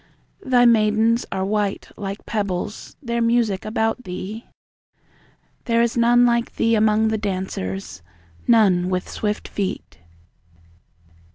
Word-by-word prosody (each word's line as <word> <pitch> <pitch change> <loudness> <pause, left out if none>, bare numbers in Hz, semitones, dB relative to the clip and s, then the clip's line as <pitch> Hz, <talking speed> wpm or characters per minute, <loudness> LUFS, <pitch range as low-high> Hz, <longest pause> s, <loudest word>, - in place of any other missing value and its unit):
Thy 245 -1 +4
maidens 225 0 +3
are 190 -1 -1
white 205 0 -2
like 200 0 -6
pebbles; 200 -2 -4
Their 235 -1 -1
music 230 -4 +1
about 225 +3 -1
thee! 195 +4 -6 1.2
There 230 -1 +2
is 235 - -1
none 240 +1 +4
like 235 0 0
thee 230 - +2
among 220 0 +3
the 220 -1 -1
dancers; 185 - -4 0.5
None 190 -6 +4
with 185 0 -2
swift 210 -1 -3
feet. 190 - -5
215 Hz, 115 wpm, -22 LUFS, 195-230 Hz, 1.2 s, Thy